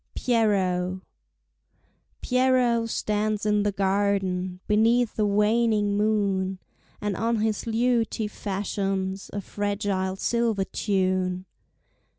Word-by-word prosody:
Pierrot 190 -6 +1 1.2
Pierrot 250 -3 +2
stands 210 -1 -1
in 210 0 +2
the 205 0 +1
garden 190 -2 0
Beneath 225 +2 +2
a 210 - +3
waning 210 0 +2
moon, 200 -3 0 0.4
And 205 -2 -2
on 230 +1 0
his 220 0 -1
lute 230 0 +1
he 220 - -2
fashions 195 -1 -3
A 205 - -4
fragile 200 -2 -2
silver 230 -1 0
tune. 185 -2 -1
205 Hz, 100 wpm, -25 LUFS, 190-225 Hz, 1.2 s, a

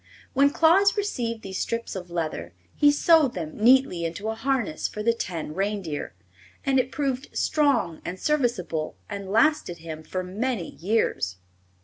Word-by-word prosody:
When 280 +1 +5
Claus 355 +8 +4
received 235 - -2
these 190 -1 -5
strips 230 -2 -3
of 180 -2 -6
leather 155 - -3 0.2
he 290 - +5
sewed 300 -2 +4
them 160 -4 -5
neatly 245 -6 +4
into 170 +6 -3
a - - -1
harness 230 - -1
for 210 - -6
the 230 +1 +3
ten 170 -8 -4
reindeer, 195 -5 -3 0.5
and 270 -1 +3
it 255 0 -1
proved 270 0 -2
strong 275 - +1
and 185 +1 -5
serviceable 235 - 0 0.2
and 200 -1 -5
lasted 225 - +2
him 160 -1 -7
for 185 +4 -4
many 205 +1 -2
years. 175 - 0
220 Hz, 150 wpm, -25 LUFS, 175-270 Hz, 0.5 s, When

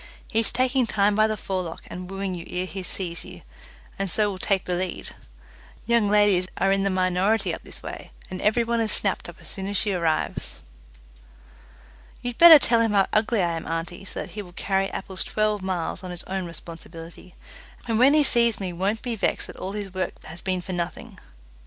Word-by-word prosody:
He 220 - +2
is 225 - +1
taking 255 -1 +1
time 205 -1 +2
by 215 +1 +4
the 215 -1 -2
forelock 185 -4 -4
and 180 0 -8
wooing 195 -1 -3
you 175 -2 -6
ere 180 +1 -2
he 190 +1 -6
sees 175 -1 -4
you, - - -12 0.6
and 195 -1 -1
so 210 +3 +3
will 190 - -7
take 195 -1 0
the 180 - -1
lead. 180 0 -3 0.8
Young 235 -3 +3
ladies 205 -3 +4
are 195 - +2
in 195 0 +2
the 195 - +1
minority 185 +3 +1
up - - -7
this - - -10
way, - - -7 0.2
and 185 0 -6
every 220 +3 +3
one 235 0 0
is 220 - +1
snapped 195 -3 +2
up 175 - -10
as - - -10
soon 195 -1 -2
as 205 0 -1
she 205 - +3
arrives." 165 -3 -1 1.7
"You'd 245 -1 -5
better 335 -2 +11
tell 235 -5 +4
him 225 -2 +2
how 195 -1 +4
ugly 215 -1 +2
I 170 - +1
am, 165 - -6
auntie, 165 +3 -4
so 195 - -5
that - - -8
he 210 - -5
will 180 -3 -12
carry 195 +1 0
apples 190 -1 -5
twelve 215 -1 0
miles 185 -1 -3
on 185 - -6
his 175 -1 +1
own 190 -1 -4
responsibility, 165 +1 -9 0.5
and 225 -1 +1
when 270 +4 +6
he 305 - +5
sees 235 -4 +3
me 185 -3 -4
won't 195 +5 -1
be 240 -2 -2
vexed 215 - 0
that - - -11
all 190 +1 -5
his 205 -3 -5
work 185 0 -2
has 170 +2 -9
been 185 -1 -1
for 190 - -5
nothing. 170 -1 -5
195 Hz, 215 wpm, -25 LUFS, 180-215 Hz, 1.7 s, better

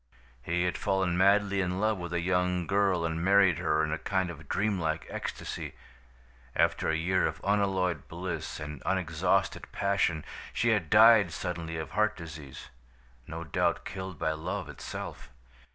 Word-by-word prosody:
He 85 +6 0
had 90 -1 -1
fallen 95 -2 +1
madly 100 +1 +3
in 90 0 -1
love 110 -1 +1
with 85 -1 -5
a 85 - 0
young 90 0 +1
girl 95 -2 +2
and 80 0 -2
married 95 -2 +5
her 80 -2 +1
in 80 - -1
a 80 - -2
kind 95 -2 -1
of 75 -3 -12
dreamlike 85 -7 0
ecstasy. - - -5 0.8
After - - +2
a 80 - +2
year 90 +3 +2
of - - -5
unalloyed 95 -3 +1
bliss 85 -1 -5
and 75 -2 -7
unexhausted - - 0
passion, 100 -5 0 0.3
she 120 - +1
had 100 -8 +1
died 110 -4 +7
suddenly 85 -1 -4
of 80 - -5
heart 110 0 +1
disease, 75 -5 -9 0.6
no 80 +1 -5
doubt 80 - 0
killed 95 -1 -6
by 80 - 0
love 80 0 -4
itself. - - -7
90 Hz, 155 wpm, -29 LUFS, 80-100 Hz, 0.8 s, died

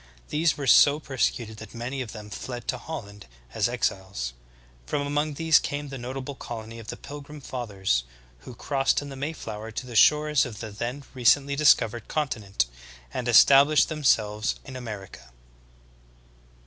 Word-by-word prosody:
These 155 +1 +1
were 145 - -4
so 145 +2 +6
persecuted 120 -6 -2
that 110 +1 -11
many 125 +4 -4
of 120 -4 -5
them 105 -1 -10
fled 120 +3 -6
to 125 - -1
Holland 105 - -8 0.3
as - - +1
ex - - +1
iles. 95 -11 -6 0.5
From 145 - -1
among 145 +1 -1
these 160 +1 +5
came 145 0 -4
the 135 -1 -7
notable 130 +3 -5
colony 115 -3 -8
of 110 - -11
the - - -6
Pil 145 0 -9
grim 150 +1 -11
Fathers, 100 - -2 0.4
who 120 - -11
crossed 135 +2 0
in 145 - -8
the 135 - -8
Mayflower 115 -7 -5
to 110 +3 -5
the 120 -2 -9
shores 150 +3 +5
of 110 -4 -6
the 110 -2 -6
then 120 +7 -4
recently 140 +3 +3
discovered 120 -6 +3
continent, 110 - -1 0.5
and 125 - -3
established 140 +4 +6
them 155 -2 -5
selves 105 -4 +2
in 135 -2 -9
America. 105 - -8
125 Hz, 165 wpm, -26 LUFS, 110-145 Hz, 0.5 s, so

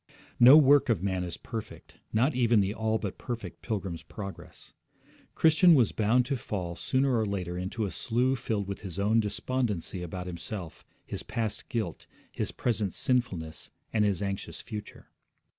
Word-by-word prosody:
No 130 +5 +10
work 145 -2 +6
of 100 -6 +1
man 95 -2 0
is 85 -2 -5
perfect, 115 -2 -8
not 125 +7 +2
even 120 -3 +3
the 100 0 +1
all 110 0 0
but 100 -4 -5
perfect 120 -2 -6
Pilgrim's 95 -7 -3
Progress. 100 -2 -9 0.6
Christian 165 +2 +6
was 125 -6 +4
bound 115 +4 +2
to 135 - -1
fall 90 -6 -4
sooner 130 +6 +1
or - - +2
later 90 -3 -3
into 95 +5 -2
a 95 - -4
slough 125 +2 0
filled 105 -4 -2
with 100 - -4
his 95 -3 -7
own 105 +3 +3
despondency 105 -4 -2
about 90 +1 -5
himself, 90 0 -6 0.2
his - - -5
past 110 -3 -3
guilt, 110 -9 -3 0.2
his - - -3
present 105 -6 -1
sinfulness, 95 -11 -1 0.2
and 110 -2 +3
his 100 -1 +1
anxious 100 -1 -4
future. 105 -1 -8
105 Hz, 160 wpm, -29 LUFS, 95-120 Hz, 0.6 s, No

